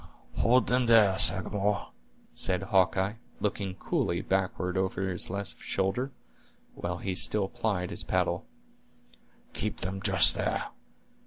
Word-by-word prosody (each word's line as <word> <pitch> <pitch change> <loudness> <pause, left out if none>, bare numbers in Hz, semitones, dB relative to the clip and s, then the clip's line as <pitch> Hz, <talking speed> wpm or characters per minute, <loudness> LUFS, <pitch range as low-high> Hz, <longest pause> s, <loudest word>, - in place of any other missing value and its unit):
"Hold 120 -1 +3
them 125 0 +1
there, 110 -5 +5
Sagamore," 100 +1 +2 0.4
said 90 0 0
Hawkeye, 95 +2 +1 0.2
looking 100 -2 -3
coolly 85 -2 -1
backward 95 -1 -1
over 95 0 -1
this 90 -2 -3
left 100 +1 -4
shoulder, 95 +8 -1 0.6
while 90 0 -4
he 95 +1 -3
still 95 +2 +3
plied 100 -5 -2
his - - -1
paddle; - - -1 1.1
"keep - - -3
them 95 +1 -3
just - - +6
there. - - -2
95 Hz, 120 wpm, -28 LUFS, 95-105 Hz, 1.1 s, just